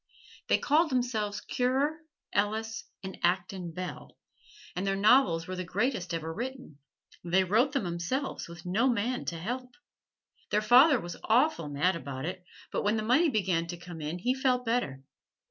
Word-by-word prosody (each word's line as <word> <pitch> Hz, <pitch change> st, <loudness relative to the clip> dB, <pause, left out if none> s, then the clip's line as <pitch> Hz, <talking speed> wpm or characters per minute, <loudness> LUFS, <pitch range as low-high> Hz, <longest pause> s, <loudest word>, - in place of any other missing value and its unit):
They -, -, +4 dB
called 315 Hz, +2 st, +2 dB
'emselves 220 Hz, -5 st, -1 dB
Currer, 270 Hz, +5 st, 0 dB, 0.3 s
Ellis 220 Hz, +2 st, -1 dB, 0.2 s
and 190 Hz, 0 st, -7 dB
Acton 180 Hz, 0 st, 0 dB
Bell, 180 Hz, +2 st, -7 dB, 0.6 s
and 185 Hz, +2 st, -2 dB
their 195 Hz, -, +1 dB
novels 195 Hz, -5 st, +4 dB
were 185 Hz, -, -5 dB
the 185 Hz, -, -3 dB
greatest 195 Hz, 0 st, -1 dB
ever 165 Hz, -1 st, -3 dB
written 250 Hz, -, -6 dB, 0.4 s
they 180 Hz, +2 st, +3 dB
wrote 225 Hz, +10 st, +2 dB
them 275 Hz, -8 st, 0 dB
'emselves 175 Hz, +11 st, -3 dB
with 170 Hz, 0 st, -11 dB
no 215 Hz, +9 st, +2 dB
man 245 Hz, +2 st, -1 dB
to 170 Hz, -, -3 dB
help. 250 Hz, +8 st, -5 dB, 0.7 s
Their 210 Hz, -, +1 dB
father 255 Hz, +5 st, +7 dB
was 175 Hz, -2 st, -7 dB
awful 225 Hz, -, +2 dB
mad 150 Hz, +6 st, +1 dB
about 140 Hz, -3 st, -5 dB
it, 185 Hz, +1 st, -5 dB, 0.3 s
but -, -, -1 dB
when 210 Hz, +2 st, +1 dB
the 215 Hz, -, -1 dB
money 270 Hz, +9 st, +4 dB
began 185 Hz, -, 0 dB
to 175 Hz, +1 st, -5 dB
come 175 Hz, -2 st, -9 dB
in 155 Hz, +3 st, -3 dB
he 245 Hz, +8 st, +1 dB
felt 255 Hz, -2 st, +1 dB
better. 225 Hz, -, -1 dB
205 Hz, 165 wpm, -29 LUFS, 175-250 Hz, 0.7 s, father